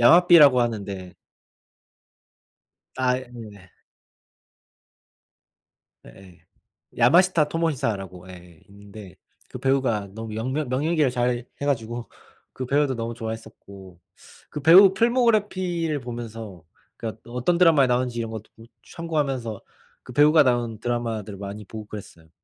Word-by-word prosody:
야마비라고 155 -1 +7
하는데 100 -6 -4 1.8
아 130 -1 +1 0.2
네. 105 -6 -12 2.4
예예. 90 +7 -16 0.6
야마시타 165 +5 +4
토모시사라고 105 - -3
예 90 -2 -14
있는데 100 -2 -13 0.3
그 - - -8
배우가 130 -7 0
너무 110 -1 -7
영 115 +4 -3
명 150 -1 -2
명연기를 145 +2 +1
잘해 120 -1 -1 0.2
가지고 120 -4 -3 0.4
그 130 - -6
배우도 140 0 +1
너무 115 0 -4
좋아했었고 100 -5 -9 0.5
그 150 - -6
배우 185 +5 +8
필모그래피를 195 - +1
보면서 115 -7 -8 0.3
그러니까 110 -1 -7
어떤 125 +9 0
드라마에 165 -6 +5
나오는지 125 -1 -1
이런 115 -1 -3
것도 110 -1 -8 0.3
참고하면서 135 - -3 0.4
그 - - -11
배우가 150 +4 +5
나온 120 -4 0
드라마들 115 -4 -3
많이 100 +2 -8
보고 110 +1 -9
그랬어요. 85 -6 -11
120 Hz, 285 characters per minute, -24 LUFS, 105-145 Hz, 2.4 s, 배우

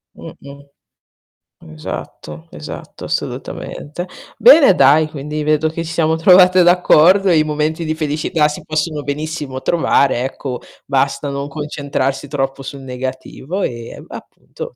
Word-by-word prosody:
Mh-mh. 140 0 -12 1.1
Esatto, 75 +1 -8
esatto, - - -9
assolutamente. 175 +5 -5 0.3
Bene 310 - +7
dai, 145 +3 +5
quindi 150 0 -5
vedo 155 +1 +1
che 165 +1 -5
ci 165 - -6
siamo 160 -1 +1
trovate 180 +1 +6
d'accordo. 180 +2 +5
I 155 -2 +4
momenti 155 +2 -2
di 155 0 -2
felicità 155 0 0
si 150 - -7
possono 155 -1 -2
benissimo 145 -2 -4
trovare, 140 -6 +2
ecco, 130 -1 -5 0.3
basta 140 +1 0
non 140 0 -4
concentrarsi 140 -2 -3
troppo 135 -1 -3
sul 135 0 -8
negativo, 130 +7 -6
ehm, 120 -1 -6
a - - -6
appunto - - -11
150 Hz, 125 wpm, -17 LUFS, 135-160 Hz, 1.1 s, Bene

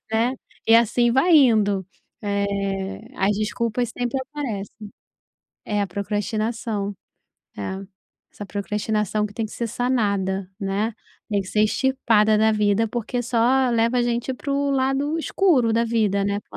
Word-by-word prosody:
né. 235 +4 +2 0.3
E 225 - +6
assim 235 +1 +3
vai 330 +6 +4
indo. 210 - +3 0.4
Eh, 200 -1 -2
as 200 +1 +1
desculpas 230 +2 -1
sempre 245 +2 -2
aparecem. 220 -7 -6 0.8
É, 210 -1 0
a 200 - -1
procrastinação. 210 +1 -2 0.6
É. 190 - -4 0.5
Essa 205 - -8
procrastinação 210 +1 -1
que 205 - -13
tem 225 - -2
que - - -13
ser 235 - -3
sanada, 200 -6 0
né? 200 +3 -1 0.3
Tem 205 -2 +1
que - - -13
ser 210 - +2
estirpada 220 -3 +2
da 220 0 +4
vida, 210 +1 +2
porque 240 +2 -3
só 250 +2 +2
leva 230 +2 +2
a - - +3
gente 240 +2 -1
pro 280 +1 -1
lado 275 +4 0
escuro 305 -10 +2
da 230 +1 +2
vida, 210 -4 +1
né, 200 0 -1
para - - -11
220 Hz, 145 wpm, -23 LUFS, 205-245 Hz, 0.8 s, E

